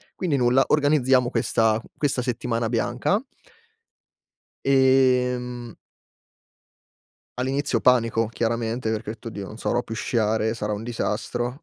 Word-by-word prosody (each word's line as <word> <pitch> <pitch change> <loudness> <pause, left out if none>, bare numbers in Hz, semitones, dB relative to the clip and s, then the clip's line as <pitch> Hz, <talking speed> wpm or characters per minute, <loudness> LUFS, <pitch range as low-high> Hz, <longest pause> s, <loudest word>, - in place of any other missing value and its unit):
Quindi 160 -7 0
nulla, 125 +2 +4
organizziamo 135 -4 +3
questa 110 -1 +1 0.2
questa 140 -4 0
settimana 120 -2 -2
bianca 125 - 0 1.4
ehm 125 -3 +2 1.7
all'inizio 135 -1 0
panico 115 -2 +3
chiaramente, 115 0 -2
perché 110 -1 -3
ho - - -3
detto: 115 - -11
"Oddio, 100 -3 -7
non 110 - -10
sarò 120 +1 0
più 115 - -7
sciare, 110 0 0
sarò 105 -2 -3
un 105 - -7
disastro." 120 +2 -3
120 Hz, 115 wpm, -24 LUFS, 115-130 Hz, 1.7 s, nulla